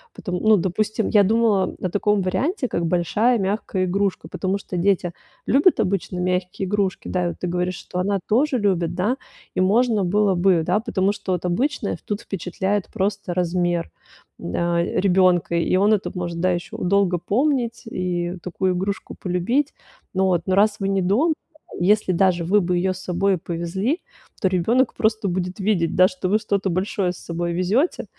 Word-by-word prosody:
Потом, 180 -4 -4
ну, 215 -1 +5
допустим, 210 +4 -1
я 205 -2 +5
думала 210 -3 +2
о 185 - -1
таком 205 +2 +1
варианте, 250 - -1
как 170 -5 -2
большая 205 +8 +2
мягкая 195 -1 -1
игрушка. 195 +1 -1
Потому 190 +1 -2
что 190 - -7
дети 180 -1 +1 0.4
любят 285 +1 +4
обычно 190 -3 -1
мягкие 180 +1 -1
игрушки. 200 -1 -1
Да, 180 -1 0
и - - -7
ты 180 - -4
говоришь, 180 +1 -1
что 180 - -6
она 200 +2 0
тоже 260 +5 +2
любит, 175 -5 +1
да. 210 +9 0 0.4
И - - +1
можно 215 +1 +3
было 200 +1 +2
бы, 175 -1 +3
да, 180 +6 +1
потому 205 -4 0
что 195 -2 -5
вот 180 -1 -1
обычное 245 +12 -1
тут 205 -1 -3
впечатляет 195 +2 -2
просто 195 -1 -2
размер, 175 -1 0 0.5
да, 170 - 0
ребёнка, 180 -2 +2
и 170 +2 +1
он 205 +3 +4
это 205 - -1
может, 175 -2 -4
да, 185 +2 +2
ещё 175 -1 -4
долго 185 -1 +2
помнить 245 - 0
и 180 -3 -2
такую 185 +1 -1
игрушку 195 +3 -3
полюбить. 200 - -1 0.4
Но 190 -2 +2
раз 205 +3 +3
вы 195 - -1
не 195 -1 +1
дома, 230 - +2 0.5
если 200 0 +3
даже 180 -1 +2
вы 205 +4 +3
бы 180 0 0
её 185 +1 +1
с 185 - -10
собой 185 +1 +1
повезли, 175 - -2 0.4
то 190 - +3
ребёнок 225 +8 +2
просто 220 -1 +1
будет 180 +2 -3
видеть, 190 -5 +1
да, 185 0 +6
что 185 0 -4
вы 215 - +3
что-то 200 -2 -1
большое 185 +1 -1
с - - -12
собой 170 0 -3
везёте. 205 - 0
190 Hz, 170 wpm, -22 LUFS, 180-210 Hz, 0.5 s, да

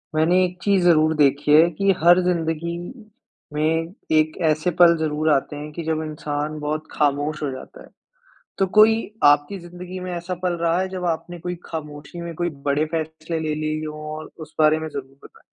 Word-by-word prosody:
मैंने 175 +4 +4
एक 180 0 -6
चीज़ 200 -3 +3
ज़रूर 160 -2 +4
देखी 145 0 +2
है 160 +3 +7
कि 195 +5 +2
हर 175 +1 +7
ज़िन्दगी 170 -1 -1 0.8
में 165 +3 0 0.2
एक 155 0 +1
ऐसे 155 +3 +1
पल 170 -1 +8
ज़रूर 155 0 0
आते 145 +1 0
हैं 150 +1 -7
कि 170 - -5
जब 160 0 -1
इंसान 150 0 -4
बहुत 150 +1 -2
खामोश 145 +1 0
हो 145 - -1
जाता 130 - -10
है। - - -17 0.7
तो 195 - +3
कोई 220 +1 +8 0.3
आपकी 145 +6 +4
ज़िन्दगी 180 +1 -9
में 180 0 -5
ऐसा 175 +2 -4
पल 180 -1 +1
रहा 170 +1 +2
है 190 - -1
जब 185 -1 -5
आपने 175 +2 -10
कोई 180 +2 -4
खामोशी 150 +1 -7
में 170 -1 -6
कोई 175 +2 -1 0.2
बड़े 145 +2 +2
फैसले 160 0 -3
ले 155 -1 -1
लिए 155 0 -2
हों, 150 0 -7 0.2
और 155 - -9
उस 155 0 -10
बारे 155 0 +5
में 160 0 -5
ज़रूर 135 -2 -8
बताएँ? - - -16
160 Hz, 195 wpm, -22 LUFS, 150-175 Hz, 0.8 s, पल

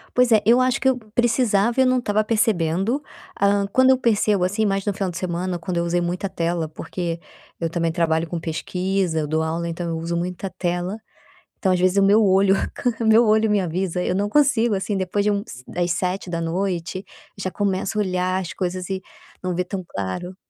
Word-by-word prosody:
Pois 250 -1 +4
é, 215 -2 +6
eu 240 +3 +5
acho 255 +1 +2
que 265 - +1
eu 260 -1 +3 0.2
precisava 235 -1 +2
e 260 - +6
eu - - +2
não 255 0 +3
estava 215 -2 +1
percebendo. 215 - +1 0.3
Ah, 200 0 +2
quando 260 0 +5
eu 260 - +6
percebo, 210 -6 +2
assim, 210 +4 0
mais 195 -1 0
no 205 - 0
final 195 -2 -2
de 170 - -7
semana, 180 0 -2
quando 180 +1 -4
eu 170 - +1
usei 175 +1 0
muita 180 +3 -2
tela, 170 -3 -2
porque 170 +1 -4 0.4
eu 165 -1 -1
também 165 -1 0
trabalho 160 -1 +1
com 170 +1 -4
pesquisa, 180 +1 -1
eu 150 - -2
dou 160 +1 0
aula, 165 +1 -2
então 170 +1 -4
eu 165 - -2
uso 170 +1 -3
muita 180 +2 -3
tela, 175 +2 -1 0.6
então, 190 -2 +1
às 180 - +2
vezes, 185 +2 +2
o - - +5
meu 205 +3 +5
olho 195 0 +4 0.2
ca 245 - 0
o - - 0
meu 225 +2 +6
olho 220 +1 +4
me 210 -1 +2
avisa, 180 0 -2
eu - - 0
não 200 +2 0
consigo, 240 -4 +3
assim, 195 +1 -2
depois 190 +2 -1
de 210 - +3
uns 200 - -4
das 175 -1 -1
19h, 180 0 -2 0.3
já 185 - -2
começo 195 +1 -1
a 210 - +3
olhar 185 0 0
as 175 - -6
coisas 185 0 -3
e 190 - -2 0.4
não 185 -1 -2
vê 180 - 0
tão 185 0 -5
claro. 170 - -5
185 Hz, 215 wpm, -22 LUFS, 175-210 Hz, 0.6 s, é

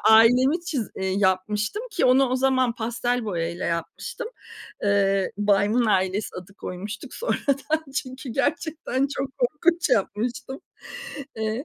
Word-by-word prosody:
ailemi 250 +8 +6
çiz 255 -8 -2
eee 190 - -2
yapmıştım, 205 - +1
ki 395 - 0
onu 260 +1 +5
o 255 - +1
zaman 260 -2 +2
pastel 240 +1 -1
boya 170 -5 -1
ile 175 +2 -5
yapmıştım. 170 - -3 0.5
Eee, 195 -1 +2
Baymın 205 +3 +3
ailesi 190 0 +1
adı 185 +2 -9
koymuştuk 205 +8 -7
sonradan 300 - -1
çünkü 260 0 -4
gerçekten 290 -1 0
çok 270 -1 -2
korkunç 315 +7 +2
yapmıştım. 245 +6 -1 0.8
Eee 220 +4 -2
240 Hz, 125 wpm, -25 LUFS, 205-270 Hz, 0.8 s, ailemi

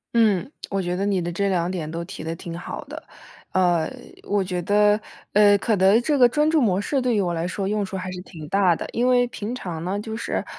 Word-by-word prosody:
嗯， 220 0 +3 0.2
我 195 0 0
觉 175 -1 -2
得 195 +2 -1
你 195 -3 +1
的 175 0 -3
这 200 +3 0
两 175 -2 0
点 170 -5 -4
都 165 +1 -4
提 170 - -8
得 165 +1 -3
挺 165 0 -7
好 175 - -6
的。 - - -9 0.5
呃， 175 -3 +2 0.3
我 205 -1 0
觉 180 -1 -3
得， 210 +2 +4 0.3
呃， 205 0 +6
可 220 +2 +1
能 195 +4 +5
这 290 +4 +1
个 250 -2 +7
专 300 +5 +2
注 320 0 +3
模 200 -7 +2
式， 275 +6 0
对 250 -2 +1
于 205 - +2
我 180 -2 0
来 165 +1 -2
说 190 +2 -3
用 210 0 0
处 190 - -7
还 185 -1 -4
是 180 - -6
挺 160 -4 -10
大 190 -2 +3
的。 - - -6
因 240 +2 +1
为 245 -1 +4
平 225 -1 -5
常 175 -10 -5
呢 190 +3 -2
就 220 +1 -5
是， - - -2
195 Hz, 265 characters per minute, -23 LUFS, 175-220 Hz, 0.5 s, 个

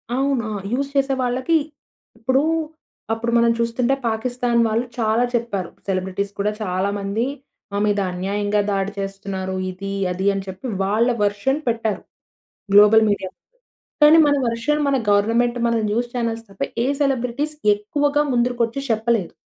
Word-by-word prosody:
అవును. 265 -4 0 0.2
యూజ్ 275 +3 -1
చేసే 275 0 +2
వాళ్ళకి 255 +6 0 0.6
ఇప్పుడూ, 260 +5 +1 0.7
అప్పుడు 230 +1 -2
మనం 235 0 +4
చూస్తుంటే 235 +3 +1
పాకిస్తాన్ 240 +1 0
వాళ్ళు 225 +2 0
చాలా 225 +1 +2
చెప్పారు. 215 -7 -2 0.2
సెలబ్రిటీస్ 190 +1 -2
కూడా 205 +1 +1
చాలా 190 -1 -1
మంది 200 +4 -1 0.5
"మా - - -1
మీద 205 -1 +1
అన్యాయంగా 205 +3 -1
దాడి 195 0 -1
చేస్తున్నారు" 195 -1 -4 0.2
ఇది, 195 +2 -6 0.2
అది 185 +2 -3
అని 195 -1 -4
చెప్పి 190 +6 -7 0.2
వాళ్ళ 215 +5 +2 0.2
వర్షన్ 205 +8 0
పెట్టారు, 225 -3 -1 0.7
గ్లోబల్ 210 +2 +7
మీడియాలో. 190 -2 -2 0.7
కానీ 300 +2 +8
మన 290 - +3
వెర్షన్ 235 +6 0
మన 280 - +2
గవర్నమెంట్, 230 +4 +2
మన 235 - +1
న్యూస్ 240 +3 -1
చానెల్స్ 230 -1 -2
తప్ప 195 - -16 0.2
ఏ - - 0
సెలబ్రిటీస్ 275 +2 -1 0.2
ఎక్కువగా 285 +8 0
ముందరకొచ్చి 240 0 0
చెప్పలేదు. 225 -3 0
225 Hz, 135 wpm, -21 LUFS, 200-245 Hz, 0.7 s, కానీ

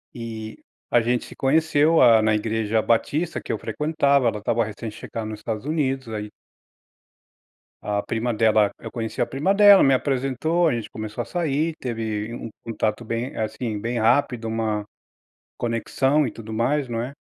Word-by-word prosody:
e 110 -2 -7 0.3
a 120 - +4
gente 120 +1 0
se - - -12
conheceu, 155 +2 +3
ah, 115 -3 +7
na 110 - +3
Igreja 110 0 0
Batista, 150 +10 0
que - - -5
eu - - -2
frequentava, 140 -4 +1
ela 105 -1 -4
estava 115 +3 +1
recém-chegando 110 0 -6
nos 105 - -7
Estados 110 +2 -4
Unidos, 135 -5 -1
ai 105 -1 -5 1.5
A 105 -1 -1
prima 115 +2 -2
dela 110 -2 +3
eu - - -8
conheci 115 -2 -3
a - - +1
prima 155 +9 0
dela, 205 -1 +8
me 135 - +5
apresentou, 135 +6 0
a - - +1
gente 115 -2 -5
começou 110 +2 -5
a - - -8
sair, 160 -1 -1
teve 110 -2 -4
um 115 - -7
contato 110 0 -2
bem, 115 +3 -3
assim, 110 -1 -3
bem 120 +2 -2
rápido, 115 0 +2
uma 110 -2 -1 0.7
conexão 135 +5 +1
e 115 - -5
tudo 110 0 -9
mais, 130 +5 0
não 115 -1 -2
é, 125 - -4
115 Hz, 165 wpm, -23 LUFS, 110-135 Hz, 1.5 s, dela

